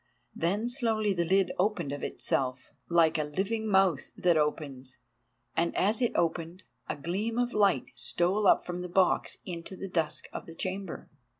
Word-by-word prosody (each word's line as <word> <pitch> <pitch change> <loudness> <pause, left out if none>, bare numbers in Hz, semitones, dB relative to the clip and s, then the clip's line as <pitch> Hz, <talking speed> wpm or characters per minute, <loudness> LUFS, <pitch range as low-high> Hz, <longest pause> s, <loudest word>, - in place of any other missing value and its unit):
Then 200 +8 0
slowly 225 -5 +1
the 170 -2 0
lid 190 +1 +3
opened 180 -7 +1
of 145 - -4
itself, 130 -1 -1 0.2
like 165 -2 +4
a - - +2
living 200 +9 -2
mouth 190 -7 +3
that 175 -2 +3
opens, 140 -4 -1 0.6
and 170 0 +1
as 210 +5 +2
it 240 - +2
opened, 170 +2 -1 0.3
a - - -1
gleam 195 +10 -2
of 245 0 +1
light 200 -3 +2
stole 190 +4 +1
up - - +5
from 180 0 -4
the 180 - -5
box 185 +1 +2
into 175 +1 -6
the 195 - -6
dusk 165 -4 -1
of - - -6
the 165 - -10
chamber. 190 0 -4
180 Hz, 170 wpm, -29 LUFS, 165-200 Hz, 0.6 s, up